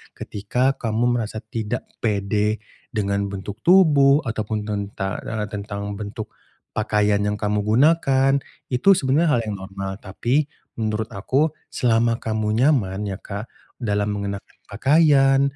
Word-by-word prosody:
Ketika 125 +7 -1
kamu 120 +1 +1
merasa 110 0 -4
tidak 110 -1 -3 0.2
pede 105 0 0 0.3
dengan 100 -2 -1
bentuk 100 +2 -6
tubuh 150 -6 +5
ataupun 110 -2 -2
tenta 100 -2 -3
eee, 110 -2 -3
tentang 100 -1 -5
bentuk 110 +1 -6 0.4
pakaian 105 -1 +1
yang 105 0 0
kamu 105 0 0
gunakan, 135 +3 +3 0.4
itu 125 +10 +2
sebenarnya 150 +2 +2
hal - - +1
yang 105 -2 -3
normal. 95 0 -5
Tapi 125 +10 0 0.3
menurut 110 0 -1
aku 135 +10 +1 0.2
selama 115 -1 +2
kamu 110 -1 -2
nyaman 105 -9 +1
ya, 95 0 -4
Kak, 100 +3 -6 0.3
dalam 105 -3 -1
mengenakan 100 0 -5 0.2
pakaian, 135 +2 +4
110 Hz, 125 wpm, -22 LUFS, 100-130 Hz, 0.4 s, tubuh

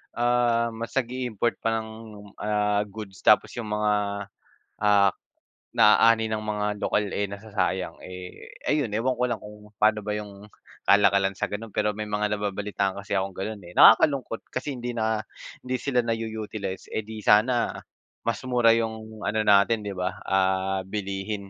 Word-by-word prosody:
ah, 120 -1 +2
mas 115 +2 -7
nag-iimport 120 -3 -1
pa 115 0 0
ng 110 - -10 0.5
ah, 105 -1 +1
goods 100 -2 -9
tapos - - +4
yung 115 - -5
mga, 105 0 +1 0.9
ah, 100 -2 +4 0.6
na-aani 110 +1 +5
ng 110 0 -2
mga 105 -1 -1 0.2
lokal 105 - +1
eh, 100 - -1
nasasayang 100 -2 -2
eh, 90 0 -10 0.2
ayun 145 -8 +1
ewan 120 +3 0
ko 125 - 0
lang 120 - -2
kung 105 0 -13
paano 110 0 +4
ba 105 - -1
yung 105 -1 -7 0.4
kalakalan 100 -1 +4
sa - - -3
ganon 105 +1 -6
pero 105 0 +1
may 110 - -3
mga 105 0 0
nababalitaan 100 -1 -2
kasi 100 0 -4
akong 95 0 -2
ganon 105 +2 -4
eh, 85 - -12
nakaka-lungkot 125 +1 +5
kasi 135 +2 -3
hindi 120 0 -4
na 110 -1 -1 0.4
hindi 130 0 -1
sila 125 -3 +1
na 115 - +1
u 115 0 -3 0.2
utilize 100 -3 -5
eh, - - 0
di 110 0 -8
sana, 115 +3 +4 0.5
mas 115 -2 0
mura 125 -2 +3
yung 110 -1 -4
ano 110 +2 +1
natin 105 +2 +4
di 100 -1 -4
ba 90 +1 -3
ah, 95 0 +1
bilihin, 100 0 -4
105 Hz, 160 wpm, -26 LUFS, 100-115 Hz, 0.9 s, na-aani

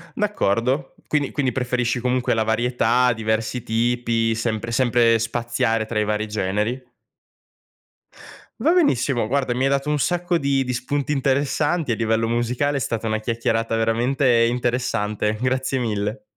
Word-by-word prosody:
D'accordo. 135 - 0
Quindi 145 -2 0
quindi 135 -3 -1
preferisci 125 0 -1
comunque 125 0 0
la 110 - +1
varietà, 120 +2 +2
diversi 110 +2 -2
tipi, 115 0 0
sempre 115 0 -3
sempre 120 -2 +3
spaziare 115 0 -1
tra 110 0 -2
i 105 - +2
vari 105 +1 -1
generi. 105 +5 -1 1.8
Va 325 - +3
benissimo, 135 - +2
guarda, 130 -1 0
mi 125 - -1
hai 135 - +3
dato 140 +1 0
un 150 -1 0
sacco 175 +3 0
di 140 -3 +1
di 125 - -3
spunti 140 +4 -2
interessanti 145 +2 0
a - - +2
livello 115 0 0
musicale, 120 +5 0
è - - -5
stata 115 -2 -2
una 110 0 -1
chiacchierata 115 0 -1
veramente 115 +2 +2
interessante, 115 -3 -1
grazie 130 +1 0
mille. 110 0 -2
120 Hz, 145 wpm, -22 LUFS, 115-130 Hz, 1.8 s, sempre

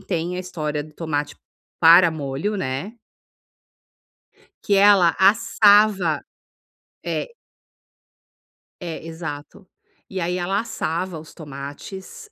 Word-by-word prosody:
tem 180 -2 -3
a 185 - -3
história 150 -5 -4
do 155 - -16
tomate 150 -3 -3 0.4
para 170 +1 +7
molho, 155 +7 -3
né 185 - -4 1.7
que 200 - +2
ela 195 -4 +5
assava 205 -4 +4 0.8
é - - -2 1.6
é, 165 -1 -6
exato, 160 0 -8 0.4
e 190 - -4
aí 180 +1 -2
ela 195 +3 0
assava 170 -5 -3
os 155 - -14
tomates, 150 - -9
175 Hz, 95 wpm, -22 LUFS, 155-195 Hz, 1.7 s, para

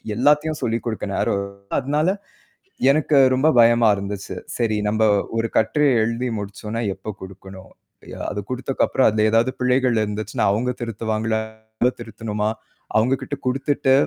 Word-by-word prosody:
எல்லாத்தையும் 150 +4 +2
சொல்லிக் 115 +1 -1
கொடுக்க 110 -2 -3
நேரம் 100 - 0 0.4
அதனால 150 +5 0 0.8
எனக்கு 150 0 +2 0.2
ரொம்ப 140 +5 +3
பயமா 115 -1 +5
இருந்துச்சு. 100 -1 -5 0.2
சரி 110 -3 +1
நம்ம 110 +1 0 0.4
ஒரு 115 0 0
கட்டுரை 145 +7 +3
எழுதி 115 +3 -1
முடிச்சோன்னா 105 +3 -5
எப்ப 110 - -7
குடுக்கணும்? 95 0 -11 0.4
ய - - -8
அதக் 105 -1 -5
குடுத்த 125 +1 -4 0.2
அப்புறம் 130 - +2
அதுல 110 0 +1
ஏதாவது 115 +3 +3
பிழைகள் 125 -1 +2
இருந்துச்சுன்னா, 105 +1 -2
அவுங்க 125 +4 0
திருத்துவாங்களா? 110 -1 -2 0.4
நம்ம 125 +1 +3
திருத்தணுமா? 110 -2 -3 0.5
அவுங்ககிட்ட 130 +5 +1
குடுத்துட்டு 135 +1 +1
115 Hz, 130 wpm, -22 LUFS, 105-130 Hz, 0.8 s, பயமா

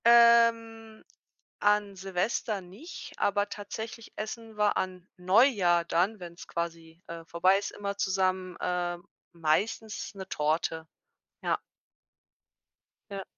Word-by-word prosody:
Ähm. 230 -1 +5 0.6
An 205 -1 +3
Silvester 195 +3 -1
nicht, 200 - -10
aber 205 0 +1
tatsächlich 220 +3 -7
essen 220 0 -6
wir 210 -1 +3
an 185 -1 -3
Neujahr 185 -3 +4
dann, 185 +6 +1
wenn's 170 -1 -10
quasi, 165 0 -5
äh, 165 0 -8
vorbei 185 +4 +3
ist, 200 - -4
immer 200 -1 -5
zusammen, 185 -2 0
ähm, 175 -1 -2 0.3
meistens 200 +8 -1
'ne 190 -1 -7
Torte. 160 0 -1 0.6
Ja. - - +1 1.5
Ja. 195 -1 -4
195 Hz, 110 wpm, -29 LUFS, 175-220 Hz, 1.5 s, Ähm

